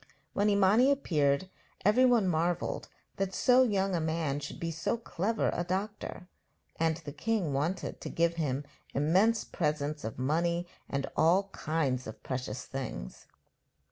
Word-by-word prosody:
When 205 +1 +2
Imani 205 +6 +5
appeared 160 - +2 0.4
everyone 240 -1 +5
marvelled 175 +1 0 0.3
that 195 -1 -1
so 250 0 +5
young 195 -6 +2
a 175 - +1
man 160 -3 -1
should 140 - -7
be 165 0 -2
so 170 +8 -1
clever 220 0 -1
a 175 - -1
doctor; 190 0 -4 0.5
and 160 -1 +2
the 155 -4 -8
king 190 -2 -1
wanted 155 +7 -2
to - - -5
give 170 0 +2
him 145 -3 -1 0.3
immense 190 +11 +3
presents 150 -2 -2
of 110 - -5
money 170 +6 +1 0.2
and 140 0 -1
of - - -11
all 175 +5 +4
kinds 150 -8 -1
of 110 - -9
precious 125 -2 -4
things. 65 - -6
170 Hz, 145 wpm, -31 LUFS, 145-195 Hz, 0.5 s, Imani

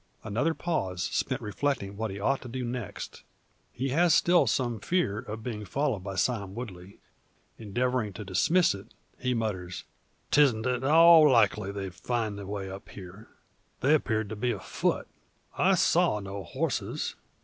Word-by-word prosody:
Another 145 +11 0
pause 95 - -2
spent - - -1
reflecting 105 -2 -2
what 110 +1 -3
he 100 +1 -6
ought 135 +7 +1
to - - -9
do 125 +1 -4
next. 120 -3 -6 0.5
He 135 +2 -3
has 165 +4 +4
still 175 0 +4
some 120 -4 0
fear 110 - 0
of 110 +1 -7
being 110 -3 -4
followed 130 +2 -1
by 100 0 -5
Sime 100 -3 -1
Woodley. 100 -6 -8 0.6
Endeavouring 120 +1 -1
to 105 +2 -7
dismiss 160 - +3
it, 100 -1 -11 0.2
he 125 -1 0
mutters: 95 -6 -3 0.5
"'Tisn't 130 -7 +4
at 125 0 0
all 160 +1 +8
likely 105 -5 +3
they'd 95 -2 -5
find 110 +3 -2
the 100 - -7
way 100 -1 -4
up 95 +1 -9
here. 100 +3 -11 0.5
They 140 +3 +4
appeared 110 -8 +1
to 110 - -5
be 120 +4 -1
afoot. - - -1 0.5
I - - +4
saw 105 - +3
no 100 -1 -6
horses. - - -2
110 Hz, 160 wpm, -28 LUFS, 100-130 Hz, 0.6 s, all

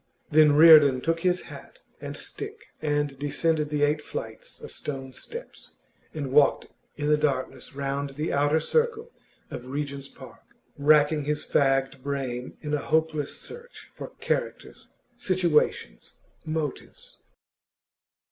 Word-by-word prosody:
Then 155 -1 +6
Reardon 150 -4 +8
took 165 +2 0
his 180 +1 +1
hat - - -12 0.2
and - - -7
stick 425 +2 -7
and 145 -3 -1
descended 150 +1 0
the 150 -1 0
eight 150 +1 +2
flights - - -8
of - - -9
stone 135 -2 -5
steps, 475 - -9 0.4
and 145 -4 -5
walked 140 +1 +4 0.3
in 145 - -3
the 150 0 +4
darkness 140 -2 -2
round 140 0 -3
the 150 +3 -2
outer 145 +2 +2
circle 465 - 0 0.4
of 125 - -7
Regent's 140 0 -4
Park, - - -14 0.3
racking 150 0 +4
his 150 0 -2
fagged 135 -1 +1
brain 130 -3 -4
in 150 -1 -4
a 150 - +1
hopeless 155 -1 0
search 480 +1 -11
for - - -8
characters, - - -3 0.3
situations, 170 - 0 0.3
motives. 155 -3 -5
150 Hz, 130 wpm, -26 LUFS, 140-160 Hz, 0.4 s, Reardon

